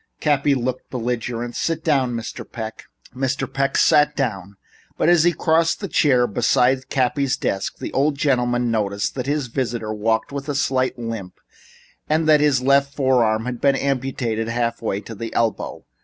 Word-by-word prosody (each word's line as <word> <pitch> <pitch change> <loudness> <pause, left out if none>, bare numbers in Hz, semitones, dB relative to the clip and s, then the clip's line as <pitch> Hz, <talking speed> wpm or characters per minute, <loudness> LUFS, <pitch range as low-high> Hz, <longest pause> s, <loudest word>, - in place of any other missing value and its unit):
Cappy 145 -1 +2
looked 130 0 -3
belligerent. 120 -1 -3
"Sit 165 -1 -2
down, 135 -7 +1
Mr. 115 0 -5
Peck." 110 -2 -7 0.3
Mr. 135 +1 -1
Peck 135 +1 -1
sat 150 0 +4
down, 100 -7 -3 0.4
but - - +2
as 175 -2 +5
he 175 - +5
crossed 165 -1 +1
to 205 - -4
the - - -9
chair 130 -5 +4
beside 125 +4 +1
Cappy's 135 +1 +1
desk, 95 -6 -2
the - - -6
old 145 +2 +2
gentleman 125 -4 +1
noticed 100 -2 -1
that 130 -1 -4
his 145 -1 0
visitor 115 -3 -3
walked 110 +2 0
with 140 +1 -5
a 145 - -1
slight 130 -2 0
limp, 115 -6 -6 0.7
and 155 +1 +1
that 155 -1 +6
his 140 -4 +2
left 140 +1 +3
forearm 120 -5 +2
had 125 -1 -4
been 140 -1 +4
amputated 130 -5 -1
half 115 0 -1
way 100 -3 -2
to 115 - -9
the 115 +1 -6
elbow. 115 -2 -1
130 Hz, 170 wpm, -21 LUFS, 115-140 Hz, 0.7 s, that